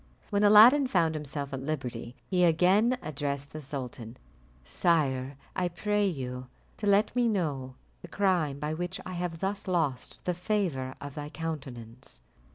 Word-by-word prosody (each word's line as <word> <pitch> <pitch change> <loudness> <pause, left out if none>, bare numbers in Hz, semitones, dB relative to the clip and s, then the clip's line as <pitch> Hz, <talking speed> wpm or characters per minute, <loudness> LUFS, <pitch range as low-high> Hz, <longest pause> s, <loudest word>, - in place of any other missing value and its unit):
When 205 0 +2
Aladdin 230 +7 +8
found 170 -8 +2
himself 145 -2 -5
at 135 - -3
liberty, 125 -5 -4
he 180 -2 +1
again 185 +9 +4
addressed 140 -1 -4
the 155 - -6
sultan: 125 -4 -6 0.5
"Sire, 135 - +1 0.2
I 185 -1 +1
pray 205 +4 0
you 130 -6 -4 0.3
to 210 - -3
let 200 +4 +3
me 245 -1 +3
know 145 - -1 0.3
the - - -9
crime 175 -8 +1
by 150 +1 -3
which 175 +3 -4
I 185 - -6
have 175 -2 -4
thus 200 +1 -2
lost 155 -9 -1
the 180 - 0
favour 175 -9 -1
of 145 -1 -7
thy 150 0 -6
countenance." 130 - -7
155 Hz, 155 wpm, -29 LUFS, 135-190 Hz, 0.5 s, Aladdin